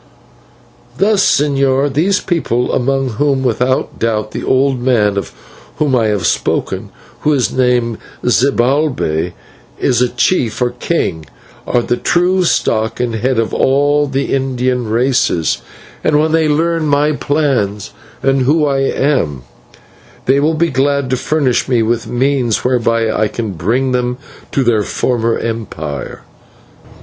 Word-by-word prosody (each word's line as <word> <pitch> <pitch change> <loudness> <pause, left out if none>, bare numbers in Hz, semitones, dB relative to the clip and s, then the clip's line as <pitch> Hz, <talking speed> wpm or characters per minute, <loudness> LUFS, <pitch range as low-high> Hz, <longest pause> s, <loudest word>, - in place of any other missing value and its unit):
"Thus, 200 0 +3
señor: 140 -1 +2
these 185 +7 +2
people 125 -8 -1
among 135 +1 0
whom 140 -2 +1
without 125 +1 0
doubt 110 -2 -1
the - - -5
old 130 -1 +1
man 110 -5 +2
of 100 - -3 0.4
whom 145 -4 +1
I 115 -3 +2
have 105 -5 -1
spoken, - - -1 0.3
who 150 - +1
is 130 -4 0
named 125 -3 +1 0.3
Zibalbay, 125 - +1 0.4
is 125 -1 +1
a 125 - +2
chief 120 - 0
or 125 -1 +1
king 120 - -2 0.4
are 120 - +1
the 120 - -1
true 180 +1 +2
stock 110 -8 0
and 120 -2 -1
head 125 +3 0
of 115 -1 0
all 145 +2 +2
the 135 0 -2
Indian 130 -2 -1
races, 115 - +1 0.4
and 150 - +3
when 155 +1 +1
they 160 -1 +2
learn 165 +1 +1
my 145 +1 +2
plans 135 -10 -1 0.3
and 135 0 +2
whom 150 +4 +2
I 135 -1 +1
am, 130 - 0 0.8
they 135 +2 +3
will 155 +3 +1
be 165 +1 +1
glad 140 0 0
to - - +3
furnish 130 -2 0
me 120 -3 +2
with 115 0 -1
means 125 -2 0
whereby 115 -3 +1
I 110 - +1
can 110 -1 -4
bring 115 +10 0
them 125 0 -1 0.3
to 135 - +1
their 115 -3 +2
former 115 +2 0
empire." 95 -11 -5
130 Hz, 140 wpm, -15 LUFS, 115-145 Hz, 0.8 s, Thus